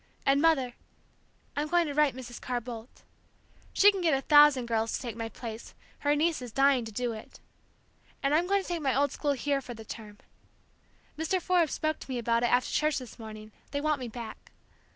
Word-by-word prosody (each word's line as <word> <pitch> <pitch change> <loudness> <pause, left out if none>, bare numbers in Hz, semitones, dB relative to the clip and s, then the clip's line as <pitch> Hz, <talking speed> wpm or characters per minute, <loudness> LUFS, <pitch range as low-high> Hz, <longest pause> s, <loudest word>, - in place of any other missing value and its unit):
And, 275 +1 +4
Mother, 280 -7 +3 0.8
I'm 295 +1 -1
going 345 +2 +3
to 290 - -3
write 295 -3 +3
Mrs. 245 -2 -8
Carr 250 -1 -2
Boldt, 235 0 -10 0.7
she 410 +1 +6
can 390 -2 -4
get 325 -5 +3
a - - -3
thousand 290 -3 +6
girls 225 -1 0
to - - -1
take 235 -4 -5
my 225 -1 -4
place, 225 -1 -8 0.2
her 290 0 +2
niece 315 0 +1
is 245 -2 -7
dying 270 -1 +3
to 220 - -7
do 240 +2 -2
it! 215 - -11 0.8
and 275 +1 +2
I'm 335 +4 +3
going 400 0 +2
to - - -11
take 345 -2 -2
my 270 -4 +1
old 285 +1 +2
school 290 -1 0
here 280 +1 -1
for 250 -2 -8
the 220 0 -11
term. 210 -2 -9 1.0
Mr. 325 +4 +1
Forbes 350 -3 +2
spoke 310 0 -1
to - - -11
me 255 - -2
about 235 0 +1
it 240 - +2
after 245 +1 +2
church 305 0 +1
this 255 -2 -8
morning; 215 -1 -9 0.2
they 285 - -2
want 300 -1 0
me 250 - -5
back. 230 0 -9
270 Hz, 215 wpm, -29 LUFS, 235-300 Hz, 1.0 s, she